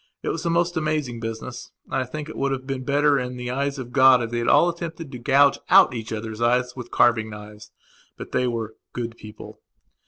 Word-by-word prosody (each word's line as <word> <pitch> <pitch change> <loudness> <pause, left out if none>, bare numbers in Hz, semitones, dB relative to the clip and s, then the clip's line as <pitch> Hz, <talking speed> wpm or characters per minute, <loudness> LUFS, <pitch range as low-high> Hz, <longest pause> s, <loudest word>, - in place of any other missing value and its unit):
It - - -2
was 165 - -3
a - - +2
most 175 +1 +1
amazing 150 -6 -1
business, 115 +2 -6 0.2
and - - -14
I 130 -1 0
think 150 +4 -6
that - - -7
it - - -11
would 140 0 0
have 130 -1 -3
been 135 -1 -4
better 145 +1 +3
in 125 0 -5
the 125 0 -4
eyes 140 +2 -2
of 125 -2 -7
God 130 -2 +6
if 115 - -5
they 120 - -1
had 120 - -2
all 175 - +5
attempted 165 -3 -5
to 125 - -7
gouge 140 +3 +4
out - - +7
each 115 -2 -6
other's 110 0 -5
eyes 125 +1 +1
with 125 -2 -8
carving 110 -2 +3
knives. 105 0 -11 0.5
But - - -9
they 125 - +1
were 115 -2 -3 0.2
"good 115 -1 -4
people". 105 -2 -12
125 Hz, 230 wpm, -23 LUFS, 115-140 Hz, 0.5 s, out